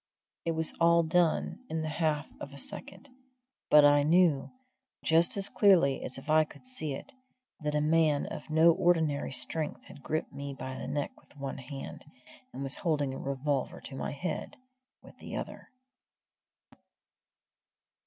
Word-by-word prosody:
It 165 - +1
was 160 0 -1
all 170 0 +5
done 170 +7 +1
in 160 0 -2
the - - -2
half 155 -2 0
of 140 - -8
a - - -10
second; 280 - -7 0.6
but 150 -1 +8
I 145 0 +6
knew, 160 -2 +3 0.6
just 165 +4 +4
as 200 0 +3
clearly 170 -10 +4
as 130 - -5
if 135 +2 -11
I 155 0 +5
could 155 - -14
see 160 - -4
it, 285 - -10 0.5
that 150 -2 -2
a 150 - +2
man 155 -1 +3
of - - -7
no 160 +2 +6
ordinary 160 -5 +1
strength 140 +4 -3
had 140 - -13
gripped 155 +2 -3
me 140 0 -6
by 130 0 -6
the - - -6
neck 145 -1 -2
with - - -23
one 140 -1 -5
hand, 135 +1 -8 0.5
and 140 - -6
was 135 0 -1
holding 145 -6 0
a - - -6
revolver 140 0 -2
to 135 - -9
my - - -3
head 155 +3 -4 0.5
with - - -16
the - - -7
other. - - -6
150 Hz, 165 wpm, -30 LUFS, 140-165 Hz, 0.6 s, but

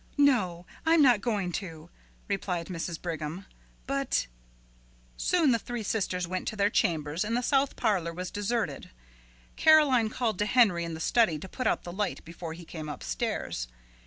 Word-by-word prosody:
"No, 205 -12 +3 0.2
I'm 325 -1 +5
not 245 -6 +5
going 205 -6 -1
to," 165 -3 -10 0.4
replied 185 -4 -2
Mrs. 170 -1 -4
Brigham; 165 +2 -5 0.4
"but 275 - 0 0.5
" - - -32
Soon 330 -6 +4
the 230 - +2
three 240 0 -5
sisters 185 -4 -1
went 185 +1 -3
to - - -2
their 205 0 +2
chambers 155 -2 +1
and 230 +3 -1
the 250 - -1
south 275 +1 +2
parlor 180 -6 0
was 180 +2 -5
deserted. 205 - -2 0.7
Caroline 285 -8 +5
called 220 -4 -1
to 210 - +1
Henry 205 -9 +4
in 165 -1 -5
the - - -7
study 215 -1 +3
to 160 - -8
put 255 +6 -3
out - - +1
the 175 - -7
light 205 +1 -3
before 165 0 -7
he 170 +1 -10
came 155 -2 -7
upstairs. - - -3
190 Hz, 170 wpm, -29 LUFS, 165-235 Hz, 0.7 s, I'm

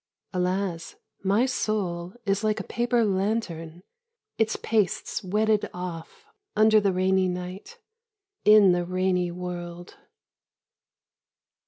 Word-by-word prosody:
Alas, 180 -2 -2 0.3
my 200 +6 +3
soul 190 -8 -2
is 200 +1 0
like 215 0 +1
a - - -4
paper 240 -1 +1
lantern, 185 -5 -2 0.6
its 220 -1 +2
pastes 210 -3 -1
wetted 210 +2 +1
off 180 - -7 0.3
under 215 0 +6
the 200 -1 +2
rainy 185 0 +2
night, 180 - -6 0.7
in 210 -3 +7
the 175 0 +1
rainy 180 0 0
world. 175 0 -7
190 Hz, 105 wpm, -26 LUFS, 180-215 Hz, 0.7 s, in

